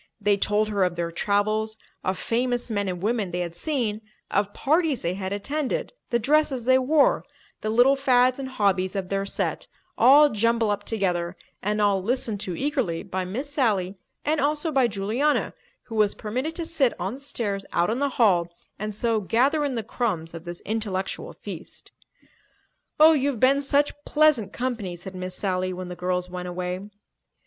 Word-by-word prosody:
They 205 -1 +3
told 210 +2 +1
her 200 -2 +1
of 180 -1 0
their 170 0 -2
travels, 215 +4 0 0.3
of 185 0 -1
famous 245 0 -1
men 205 -2 0
and 180 0 -5
women 215 -3 0
they 175 +1 -2
had 170 -1 -4
seen, 220 - -1 0.3
of 205 0 +1
parties 310 - +1
they 170 - 0
had 190 0 -4
attended, 275 - -2 0.2
the 235 - +2
dresses 275 0 +2
they 260 +1 +5
wore, 285 +3 +3 0.4
the 215 - -2
little 245 +5 +5
fads 255 -1 +3
and 265 -1 -4
hobbies 195 -6 +1
of 190 -2 -3
their 195 0 -1
set—all 290 +8 +3
jumbled 230 0 +1
up 205 - -3
together 180 -4 -1 0.2
and 210 +2 -1
all 200 -2 +3
listened 225 0 -1
to 185 -3 -3
eagerly 260 - -1
by 185 0 -3
Miss 255 +10 -4
Sally 205 -9 +1 0.3
and 305 0 +1
also 300 +3 0
by 265 -4 +3
Juliana, 225 +8 0 0.3
who 240 - -11
was 210 -2 +2
permitted 255 +9 -3
to 335 - -2
sit 300 -7 +1
on 190 +4 -2
the 265 - -8
stairs 225 -8 -3
out 175 +4 +2
in 235 - -1
the 285 0 +1
hall 185 -8 +4 0.3
and 215 0 -3
so 225 0 +1
gather 260 - +2
in 280 -3 -1
the 225 - -2
crumbs 180 -8 -2
of 165 0 -9
this 175 0 -7
intellectual 205 -3 -3
feast. - - -10 1.1
"Oh, 315 +1 +9
you've 280 -4 0
been 275 +3 +4
such 285 +1 +2
pleasant 300 -10 +3
company," 235 -8 -3
said 180 +2 -9
Miss 185 0 -5
Sally 185 -1 -1
when 180 0 -6
the 180 - -6
girls 180 0 -1
went 180 0 -6
away. 180 +2 -4
215 Hz, 180 wpm, -25 LUFS, 190-260 Hz, 1.1 s, Oh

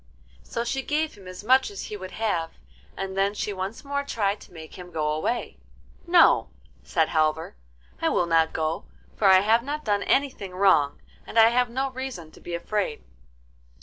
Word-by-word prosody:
So 235 - -4
she 270 +3 -2
gave 305 +3 -1
him 195 -3 -14
as 185 +2 -9
much 260 +4 +4
as 200 -2 -7
he 210 - -6
would 185 -2 -7
have, 175 -7 -1 0.4
and 190 0 -4
then 195 +1 +1
she 210 - -2
once 195 +8 -5
more 280 0 -1
tried 210 -7 -1
to - - -15
make 160 -2 -11
him 180 -1 -10
go 155 -3 -1
away. 155 +11 -2 0.5
'No,' 345 -1 +5 0.3
said 160 -2 +1
Halvor, 155 - 0 0.5
'I - - +2
will 175 - +2
not 165 -1 +3
go, 160 +1 -2 0.3
for 205 - +2
I 190 -1 +7
have 220 +3 +4
not 295 +4 -5
done 205 -1 +1
anything 260 -10 0
wrong, 180 -7 +3 0.3
and - - -6
I 225 0 +8
have 245 +1 +2
no 265 +3 -2
reason 255 -11 -6
to - - -17
be 175 - -5
afraid. 185 -2 -2
200 Hz, 185 wpm, -25 LUFS, 170-245 Hz, 0.5 s, I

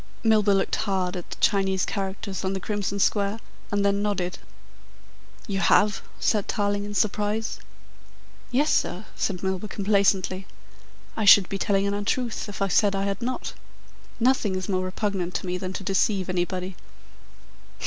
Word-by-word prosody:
Milburgh 215 -3 +4
looked - - 0
hard 190 -2 -1
at 175 - -6
the - - -6
Chinese 190 -2 +2
characters 195 -1 -4
on 190 0 0
the 190 - -2
crimson 200 0 -2
square, 200 +2 +1 0.3
and 205 0 +1
then 200 0 +2
nodded. 195 -3 -1 1.1
"You 195 -4 -2
have?" 210 +2 +4 0.2
said 210 -3 +1
Tarling 205 -1 0
in 205 0 -6
surprise. 210 +2 0 0.9
"Yes, 285 +5 +2
sir," 190 +5 0
said 195 - -1
Mr. 180 - -16
Milburgh 190 +2 -2
complacently. 195 -2 +1 0.7
"I 220 - -1
should 200 -2 +8
be 195 - -3
telling 200 -1 +1
an 200 - 0
untruth 215 +3 -2
if 200 0 -3
I - - +2
said 200 +1 +3
I 195 - 0
had 200 +3 -2
not. 255 +2 -3 0.7
Nothing 235 -5 +2
is 185 -1 -3
more 185 -2 0
repugnant 185 -2 -2
to - - -2
me 180 0 -2
than 185 0 -4
to 195 - -5
deceive 195 0 +1
anybody." 180 +1 -2
200 Hz, 160 wpm, -25 LUFS, 190-205 Hz, 1.1 s, should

